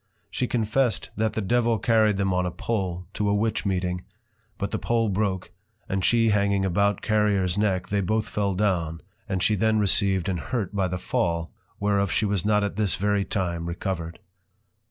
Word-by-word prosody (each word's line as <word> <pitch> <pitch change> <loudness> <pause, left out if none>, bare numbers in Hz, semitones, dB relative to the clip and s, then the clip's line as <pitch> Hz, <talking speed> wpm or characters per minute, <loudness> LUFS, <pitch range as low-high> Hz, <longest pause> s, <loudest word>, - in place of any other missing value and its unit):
She 125 - -1
confessed, 120 +1 0
that 110 0 0
the 110 - -1
Devil 120 +2 +2
carry'd 110 -2 +3
them 95 -1 +1
on 90 0 +1
a 90 - -1
pole, 90 -3 -3
to 105 -1 0
a 100 - +2
Witch 110 0 0
meeting; 90 -1 -1 0.5
but 100 - -3
the - - -2
pole 115 -2 +1
broke, 95 -2 -1 0.4
and 95 0 -1
she 115 +1 +4
hanging 100 -2 +2
about 100 +3 +1
Carriers 105 -4 +2
neck, 95 -3 0
they 100 0 +1
both 110 +3 0
fell 100 -2 -1
down, 85 -5 0 0.3
and 95 -1 0
she 110 - +3
then 110 +2 +2
received 100 -2 +2
an 95 -2 0
hurt 110 -3 -3
by 95 -2 +1
the 90 0 -3
Fall, 85 -2 -1 0.3
whereof 100 -1 +1
she 110 - +1
was 100 -4 0
not 105 0 +2
at 100 -1 -3
this 105 -3 +1
very 100 +1 +1
time 85 -5 -2
recovered. 85 -1 -4
100 Hz, 185 wpm, -25 LUFS, 95-110 Hz, 0.5 s, she